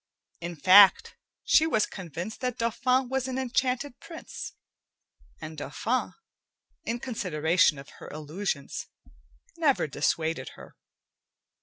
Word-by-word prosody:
In 170 0 -6
fact, 190 +5 +6 0.3
she 320 - +4
was 220 -9 +2
convinced 180 - -7
that 250 -2 -2
Dauphin 250 +2 +1
was 265 0 -1
an 260 0 -3
enchanted 255 +1 -1
prince, 330 -1 -8 0.9
and 155 -1 -8
Dauphin, 230 - -2 0.7
in 235 +1 -3
consideration 175 - +1
of 140 0 -11
her - - -9
illusions, 155 0 -4 0.7
never 300 -5 +2
dissuaded 160 +2 -1
her. - - -14
210 Hz, 110 wpm, -27 LUFS, 160-255 Hz, 0.9 s, fact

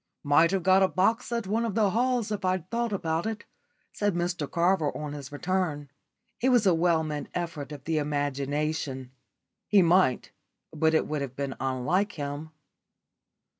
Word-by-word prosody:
"Might 145 +3 +5
have 190 -1 -1
got 190 +1 +5
a 190 - +5
box 220 +7 +1
at 235 -2 -1
one 220 +4 0
of 225 -4 -2
the 210 -3 +3
halls 240 -1 0
if 205 -1 -3
I'd 185 -2 0
thought 235 -1 -1
about 165 -2 -1
it," 220 -1 -5 0.5
said 205 -3 0
Mr 175 -4 -2
Carver 170 -3 +2
on 150 -1 -5
his 140 -2 -8
return. 150 -3 -2 0.5
It 260 - +3
was 245 -4 +4
a 185 - +5
well 165 -1 +2
meant 150 -1 -4
effort 165 -5 -4
of 145 -2 -8
the 160 +1 0
imagination. 145 -2 -2 0.6
He 200 -3 +5
might, 170 -7 +3 0.4
but 160 +1 +2
it - - +2
would 150 -1 -3
have 135 -2 -5
been 140 -1 -3
unlike 135 +11 0
him. 145 +1 -5
165 Hz, 170 wpm, -27 LUFS, 145-195 Hz, 0.6 s, Might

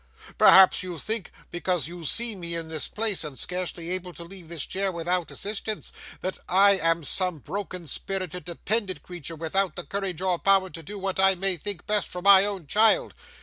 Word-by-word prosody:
Perhaps 190 -1 +7
you 180 -2 -6
think, 220 +3 -2 0.2
because 175 -3 -1
you 170 -1 -9
see 230 - -2
me 170 -2 -3
in 165 -1 -4
this 160 -2 -1
place 215 -4 0
and 145 -4 -8
scarcely 180 -1 -4
able 180 -1 -3
to 170 - -9
leave 180 0 -11
this 165 -4 -3
chair 195 0 -2
without 175 0 -1
assistance, 215 +1 -4 0.3
that 185 - -4
I 195 +2 +6
am 165 0 +1
some 180 +3 0
broken 180 +3 -6
spirited 180 +3 -4
dependent 185 0 -2
creature, 170 -2 -7
without 175 +4 -1
the 175 - -5
courage 195 -4 -4
or 185 -2 0
power 195 -1 +3
to 165 - -7
do 205 +7 -8
what 195 -1 -3
I 190 0 +5
may 190 +1 +1
think 180 +1 -6
best 210 -1 +1
for 180 - -7
my 200 0 +8
own 195 -5 -4
child. 215 +9 +4
185 Hz, 190 wpm, -25 LUFS, 170-195 Hz, 0.3 s, my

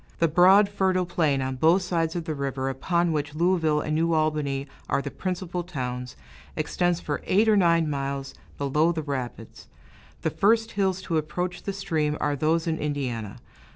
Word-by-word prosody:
The 165 - +3
broad, 185 +6 +6
fertile 190 -2 +1
plain 155 -6 +1
on 130 0 -3
both 165 +7 +4
sides 165 -2 -1
of 170 -2 -3
the 160 - -2
river, 135 -2 -2
upon 170 +6 0
which 150 -1 -2
Louisville 165 -3 +2
and 155 - -2
New 165 +2 +1
Albany 150 -3 0 0.2
are - - +2
the 140 0 -5
principal 180 0 -3
towns, 125 -7 -5 0.4
extends 175 -1 0
for 145 -4 -3
eight 210 +4 +3
or 215 - +5
nine 170 -4 +3
miles 140 -1 -3 0.2
below 150 +4 +2
the 160 -2 -3
rapids. 130 -5 -6 0.6
The - - +1
first 225 +2 +2
hills 190 -2 0
to 165 -3 -1
approach 175 +4 -3
the 200 - -3
stream 155 -6 -1
are 145 -1 0
those 160 +3 +1
in 160 -1 -1
Indiana. 125 -8 -3
160 Hz, 175 wpm, -26 LUFS, 140-180 Hz, 0.6 s, broad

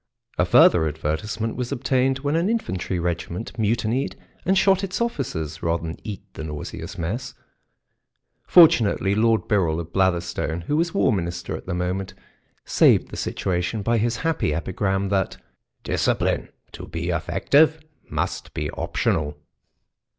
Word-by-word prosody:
A - - +4
further 80 -2 +6
advertisement 80 +9 -3
was 125 0 -3
obtained 130 0 +1
when 145 +2 0
an 170 +4 +1
infantry 95 - -2
regiment 85 +4 -3
mutinied 115 +4 0 0.3
and 190 +2 +3
shot 195 0 +4
its 190 -1 -3
officers 80 - -3
rather 85 0 0
than 80 0 -5
eat 105 -4 -6
the - - -7
nauseous 75 -1 -6
mess; 115 +10 -4 1.1
fortunately. 115 - +5
Lord 110 +1 +2
Birrell 85 -7 +1
of 85 0 -7
Blatherstone, 85 -3 0
who 145 +13 -2
was 170 +4 0
War 135 -10 +3
Minister 85 -3 -3
at - - -9
the 90 - -2
moment, 90 +2 -2 0.5
saved - - +4
the - - -8
situation 90 +3 -2
by 115 +2 +2
his 115 +2 +1
happy 160 - +1
epigram, 95 +3 -1
that 95 -2 0 0.5
"Discipline - - 0 0.2
to - - -9
be 85 +1 -4
effective 150 - +3 0.3
must - - -3
be 75 -2 -2
optional." 75 0 -1
95 Hz, 140 wpm, -23 LUFS, 85-125 Hz, 1.1 s, further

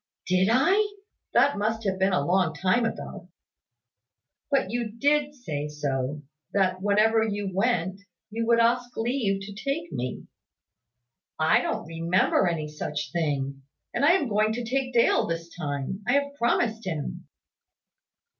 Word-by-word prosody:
"Did 185 +2 +2
I? 390 - +3 0.4
That 250 -1 +4
must 220 +2 -1
have 190 -2 -1
been 190 +1 +3
a 160 -6 +1
long 180 -2 +2
time 190 +10 +2
ago." - - -6 1.2
"But 270 -9 +1
you 235 -1 -2
did 290 +4 +1
say 150 - -4
so, 145 -1 -3 0.3
that, 185 -2 +1
whenever 215 +3 +3
you 205 -3 -2
went, 195 -2 0 0.3
you 230 +1 -2
would 235 0 +4
ask 245 +1 +1
leave 225 -4 0
to 200 +1 -8
take 275 +10 -3
me." 125 0 -4 1.1
"I 155 0 +4
don't - - -2
remember 165 +3 +2
any 160 -3 -1
such 150 -1 -4
thing. 140 -4 -2 0.3
And - - -1
I 310 +4 +6
am 325 -7 +2
going 215 0 +2
to 240 +2 -3
take 260 +2 -1
Dale 235 -2 +3
this 165 0 -5
time. 145 +3 -4
I 245 - +3
have 280 0 +1
promised 235 -3 0
him." 155 -5 -4
205 Hz, 145 wpm, -26 LUFS, 165-240 Hz, 1.2 s, I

